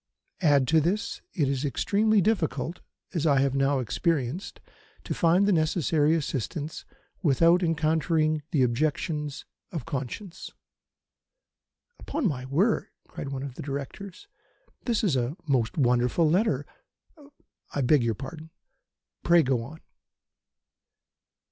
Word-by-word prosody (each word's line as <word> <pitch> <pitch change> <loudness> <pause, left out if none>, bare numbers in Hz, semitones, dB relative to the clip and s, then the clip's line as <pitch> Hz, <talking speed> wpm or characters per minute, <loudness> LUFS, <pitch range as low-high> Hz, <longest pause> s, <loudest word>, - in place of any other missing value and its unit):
Add 145 -6 +4
to 160 0 +5
this, 185 +7 -1
it 150 -8 +2
is 135 0 -1
extremely 205 - +2
difficult, 175 -4 -1 0.3
as 165 -3 0
I 140 -2 +4
have 135 -1 +1
now 135 +1 +2
experienced, 145 - -2 0.4
to - - -3
find 175 +4 +3
the - - +4
necessary 160 -2 +2
assistance 150 0 -4 0.4
without 165 +3 +4
encountering 155 -1 +1
the 140 -5 +2
objections 150 +3 -1 0.3
of 160 -8 -5
conscience." 160 - -5 1.5
"Upon 290 -5 -1
my 130 -6 -3
word!" 175 - +1 0.2
cried 140 - -7
one 135 -1 -4
of 140 -3 -6
the - - -8
Directors, 145 +7 -6 0.6
"this 230 -4 0
is 180 -10 +2
a 125 +6 -1
most 125 -3 +1
wonderful 125 +4 +3
letter. 155 - +1 1.1
I 145 - +1
beg 140 +2 +4
your 115 -2 0
pardon. 155 +6 -8 0.7
Pray 170 -1 +5
go 130 -2 +1
on." 150 +7 -10
155 Hz, 125 wpm, -27 LUFS, 135-170 Hz, 1.5 s, to